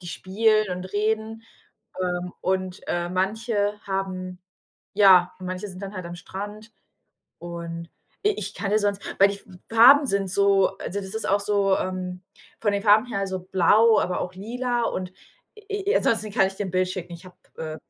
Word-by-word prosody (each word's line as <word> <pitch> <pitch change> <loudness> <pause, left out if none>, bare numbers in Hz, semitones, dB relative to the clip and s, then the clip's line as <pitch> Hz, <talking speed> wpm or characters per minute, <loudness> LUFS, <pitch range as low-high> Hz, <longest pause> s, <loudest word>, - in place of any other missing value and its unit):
die 180 - -11
spielen 215 +3 +1
und 180 0 -4
reden, 220 +3 -2 0.6
ähm. 180 0 -2
Und, 185 0 -2
ähm, 175 0 -2
manche 205 +2 -1
haben 185 -2 -4 0.6
ja, 185 -3 +6
manche 185 +2 -5
sind 185 -1 -10
dann 195 +1 -6
halt 185 -3 -6
am 170 - -7
Strand. 205 +5 -8 0.7
Und 170 -1 -7 0.4
i - - +6
ich - - -5
kann 200 - -3
ja 210 - +4
sonst 205 -1 -1 0.2
weil 195 - +7
die 200 - -3
F - - -17 0.3
Farben 260 +6 +7
sind 200 -4 0
so 200 0 +3
also 200 - -4
das 190 0 -8
ist 220 - -3
auch 200 +1 +3
so, 200 -1 +2
ähm, 185 -1 -4 0.4
von 205 -2 +1
den 200 0 -1
Farben 215 +1 +5
her 235 -5 -3
also 190 -1 -2
blau, 200 +5 +4
aber 180 - -1
auch 180 - -6
lila. 240 +4 -2
Und 185 -4 -3 0.5
i 410 -1 -4
i - - +4
ansonsten 215 -2 0
kann 195 - +3
ich 195 - -5
dir 205 - -3
'n - - -6
Bild 185 +1 +1
schicken. 180 -1 -6
Ich 170 +2 -10
habe 180 - -15 0.2
äh, 155 -1 -5
195 Hz, 190 wpm, -24 LUFS, 185-215 Hz, 0.7 s, weil